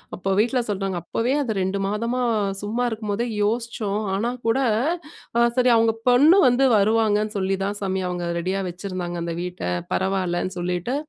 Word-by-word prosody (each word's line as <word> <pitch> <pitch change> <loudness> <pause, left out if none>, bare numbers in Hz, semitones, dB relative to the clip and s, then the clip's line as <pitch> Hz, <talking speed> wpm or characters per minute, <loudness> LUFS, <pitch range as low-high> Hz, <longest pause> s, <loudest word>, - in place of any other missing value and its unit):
அப்போ 190 +2 -4
வீட்ல 245 +4 +2
சொல்றாங்க, 195 -2 -2
"அப்பவே 230 +8 -1
அது 240 -6 -1
2 190 +2 -1
மாதமா 230 +5 -1 0.4
சும்மா 225 +4 -2
இருக்கும்போதே 215 0 -2 0.2
யோஸ்ச்சோம். 215 -2 -1
ஆனா 210 +5 0 0.2
கூட 225 +4 +2 1.0
சரி 250 -1 +4
அவங்க 225 0 +3 0.2
பொண்ணு 295 +10 +6
வந்து 250 +2 +3
வருவாங்கன்னு 215 0 +2
சொல்லி 190 0 0
தான் 200 +1 -3
சாமி 190 -1 -1
அவங்க 175 -1 -3
ரெடியா 190 +3 -1
வச்சுருந்தாங்க 180 -1 -5
அந்த 170 -1 -3
வீட்ட 180 0 -6 0.3
பரவாயில்லன்னு" 185 -1 -1
சொல்லிட்டு 180 +7 -2
205 Hz, 145 wpm, -23 LUFS, 185-230 Hz, 1.0 s, பொண்ணு